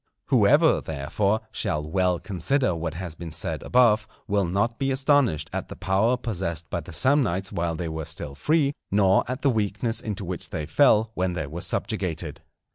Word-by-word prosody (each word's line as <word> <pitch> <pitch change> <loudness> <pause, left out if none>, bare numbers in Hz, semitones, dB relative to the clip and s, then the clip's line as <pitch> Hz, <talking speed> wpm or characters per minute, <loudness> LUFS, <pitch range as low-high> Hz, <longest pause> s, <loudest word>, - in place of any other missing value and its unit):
Whoever, - - +5
therefore, 100 +10 -1
shall 75 0 -2
well 90 +1 +1
consider 105 - 0
what 80 -1 -4
has 90 -2 -5
been 85 0 -8
said 80 0 -3
above, 110 -4 +3 0.2
will 100 -2 +1
not 100 +7 -1
be 135 - 0
astonished 135 - +2
at - - -3
the - - -8
power 95 +6 +1
possessed 85 - -3
by - - -1
the - - -10
Samnites 95 - +1
while 85 -1 -1
they 85 +1 -4
were 80 -1 -4
still 75 -3 -6
free, 145 - +1 0.2
nor 95 -1 +4
at 125 +2 -4
the 140 - +4
weakness 110 +1 -1
into 100 -2 -4
which 90 0 -4
they 80 -3 -4
fell 110 - +4
when 90 -2 -1
they 85 -4 -3
were 80 +5 -6
subjugated. 80 -6 -3
95 Hz, 180 wpm, -25 LUFS, 85-115 Hz, 0.2 s, Whoever